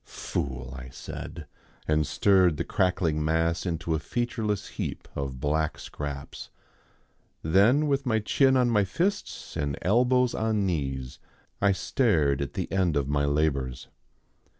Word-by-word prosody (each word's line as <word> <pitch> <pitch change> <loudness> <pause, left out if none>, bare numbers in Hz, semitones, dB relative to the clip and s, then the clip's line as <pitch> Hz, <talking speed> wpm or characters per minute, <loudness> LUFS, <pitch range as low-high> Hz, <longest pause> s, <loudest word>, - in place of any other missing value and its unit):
"Fool!" 65 -1 -4
I 65 -1 -8
said, 80 +5 -8 0.4
and 75 -1 +2
stirred 95 -6 +4
the - - -1
crackling 85 -4 +1
mass 80 +3 +1
into 85 -1 -2
a 80 - 0
featureless 110 -2 -2
heap - - -5
of 70 -2 -4
black 75 +2 0
scraps. 70 -1 -7 0.9
Then 100 - +4
with 140 -1 0
my 110 -2 +3
chin 130 +5 +3
on 125 -2 +3
my 105 -3 +4
fists 180 - -2
and 70 -1 -2
elbows 125 +5 +3
on 110 -2 0
knees 65 -7 -3 0.4
I 100 0 +4
stared 85 - +1
at 70 - -3
the - - -3
end 90 -5 +1
of 70 -2 0
my 70 0 +1
labours. 70 -3 -1
85 Hz, 140 wpm, -27 LUFS, 70-105 Hz, 0.9 s, stirred